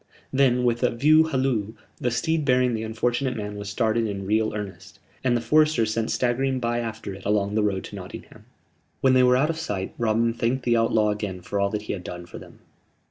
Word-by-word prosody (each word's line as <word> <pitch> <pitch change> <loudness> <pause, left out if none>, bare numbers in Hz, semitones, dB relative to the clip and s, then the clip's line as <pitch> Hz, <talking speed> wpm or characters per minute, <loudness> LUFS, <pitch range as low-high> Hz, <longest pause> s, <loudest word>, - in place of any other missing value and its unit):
Then, 130 -2 +3
with 120 -1 +1
a - - +3
"view 155 +6 +4
halloo," 130 -8 -1 0.2
the 125 - -1
steed 160 +6 0
bearing 125 -2 +3
the 110 - -2
unfortunate 120 +3 -1
man 105 -1 -5
was 100 0 -6
started 115 +1 +1
in 100 -2 -4
real 110 +2 +1
earnest; 100 -1 -7 0.3
and 120 -2 +2
the - - -3
foresters 150 -3 +3
sent 115 0 -1
staggering 130 +2 0
by 120 -1 -1
after 110 -4 -5
it 95 0 -11
along 100 0 0
the 110 - +2
road 100 -2 0
to - - -9
Nottingham. - - -10 0.6
When 130 -1 +4
they 130 - +5
were 125 0 +5
out 150 +5 +2
of 160 - -6
sight, 100 -12 -4
Robin 115 0 +2
thanked 120 +3 -1
the 120 -1 +2
outlaw 115 -2 +2
again 105 -3 -4
for 100 +3 -3
all 100 0 +2
that 105 0 -3
he - - -3
had 95 -3 -6
done 90 0 -7
for - - -10
them. - - -14
115 Hz, 220 wpm, -24 LUFS, 105-125 Hz, 0.6 s, they